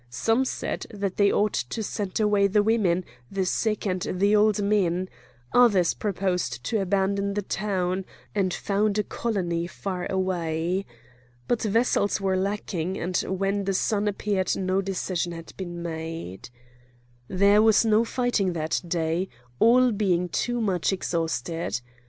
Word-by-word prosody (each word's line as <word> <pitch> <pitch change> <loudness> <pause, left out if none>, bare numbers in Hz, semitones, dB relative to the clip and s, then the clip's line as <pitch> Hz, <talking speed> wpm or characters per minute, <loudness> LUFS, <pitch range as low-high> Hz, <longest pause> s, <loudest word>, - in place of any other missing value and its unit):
Some 225 - +1
said - - -3
that 200 -3 -4
they 200 -1 +4
ought 210 0 +2
to 125 - -2
send 205 -1 -3
away 205 -2 +3
the 205 +1 +3
women, 195 -5 +2 0.2
the 195 -1 -1
sick, 215 +3 0
and 185 -2 -1
the 200 +5 +2
old 210 0 +4
men; 190 -3 +1 0.5
others 205 -8 +5
proposed 180 - -2
to 215 - 0
abandon 200 +1 0
the 205 - -1
town, 190 -2 -1 0.3
and 195 -3 +1
found 205 +3 0
a 210 - +2
colony 175 -9 -2
far 185 -1 -4
away. 180 -1 -1 0.6
But 240 - +1
vessels 215 -1 +2
were 190 -1 0
lacking, 190 -2 -2
and 180 +2 -3
when 195 +1 -1
the 195 0 0
sun 210 +1 +1
appeared 200 -2 0
no 190 0 +1
decision 185 -2 -2
had 165 -1 -9
been 175 -2 -6
made. 160 - -6 0.8
There 200 +5 +4
was 220 +1 +5
no 220 0 +4
fighting 235 -6 0
that 160 -1 -1
day, 170 +2 -1 0.3
all 250 +2 +5
being 180 -4 +1
too 240 +7 -1
much 190 -5 +1
exhausted. 165 -5 -2
195 Hz, 145 wpm, -26 LUFS, 175-210 Hz, 0.8 s, others